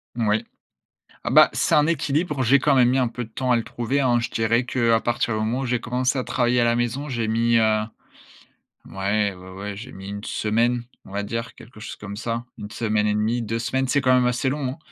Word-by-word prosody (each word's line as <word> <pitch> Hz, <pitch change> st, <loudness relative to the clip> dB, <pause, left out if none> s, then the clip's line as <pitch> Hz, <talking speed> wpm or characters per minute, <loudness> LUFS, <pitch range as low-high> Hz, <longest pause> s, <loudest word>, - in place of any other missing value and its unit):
Oui. 110 Hz, -1 st, +1 dB, 0.8 s
Ah, -, -, -1 dB
bah, -, -, +7 dB
c'est -, -, +1 dB
un 150 Hz, 0 st, +5 dB
équilibre. 150 Hz, -2 st, 0 dB
J'ai 135 Hz, +4 st, +5 dB
quand 140 Hz, +1 st, +2 dB
même 125 Hz, -2 st, +5 dB
mis 130 Hz, -, +2 dB
un 125 Hz, -2 st, +2 dB
peu 120 Hz, +1 st, -5 dB
de 110 Hz, -, -15 dB
temps 130 Hz, +2 st, -2 dB
à 120 Hz, -, +5 dB
le 115 Hz, -, -1 dB
trouver, 120 Hz, +4 st, -2 dB
hein, 120 Hz, -3 st, +2 dB
je 115 Hz, -, -3 dB
dirais 115 Hz, +2 st, +1 dB
qu'à 115 Hz, -3 st, +2 dB
partir 120 Hz, -1 st, -1 dB
du 110 Hz, -, -1 dB
moment 115 Hz, +4 st, -1 dB
où 135 Hz, -, -2 dB
j'ai 125 Hz, -1 st, 0 dB
commencé 125 Hz, +2 st, -1 dB
à 125 Hz, -, -1 dB
travailler 120 Hz, 0 st, +1 dB
à 120 Hz, -, +3 dB
la 120 Hz, 0 st, +2 dB
maison, 120 Hz, +5 st, -2 dB
j'ai 115 Hz, -4 st, -2 dB
mis, 115 Hz, +1 st, +2 dB
heu, 110 Hz, -1 st, +3 dB, 1.1 s
ouais, 100 Hz, +1 st, -1 dB
ouais, 90 Hz, +1 st, -12 dB
ouais, 100 Hz, +2 st, -6 dB
j'ai 120 Hz, +5 st, -9 dB
mis 95 Hz, +1 st, -9 dB
1 100 Hz, +1 st, -6 dB
semaine, 120 Hz, +3 st, 0 dB, 0.2 s
on 95 Hz, -, -13 dB
va 100 Hz, -, -2 dB
dire, 115 Hz, +2 st, -4 dB
quelque 110 Hz, -3 st, -15 dB
chose -, -, -7 dB
comme 100 Hz, -1 st, -8 dB
ça, 115 Hz, +1 st, -3 dB
1 105 Hz, 0 st, -7 dB
semaine 105 Hz, -1 st, 0 dB
et 105 Hz, -, +1 dB
demi, 115 Hz, +3 st, 0 dB
2 115 Hz, +1 st, -2 dB
semaines, 130 Hz, +3 st, -1 dB
c'est 145 Hz, +2 st, +2 dB
quand 130 Hz, -1 st, +3 dB
même 125 Hz, -1 st, +3 dB
assez 125 Hz, +2 st, 0 dB
long. 135 Hz, 0 st, -3 dB
120 Hz, 240 wpm, -23 LUFS, 110-125 Hz, 1.1 s, bah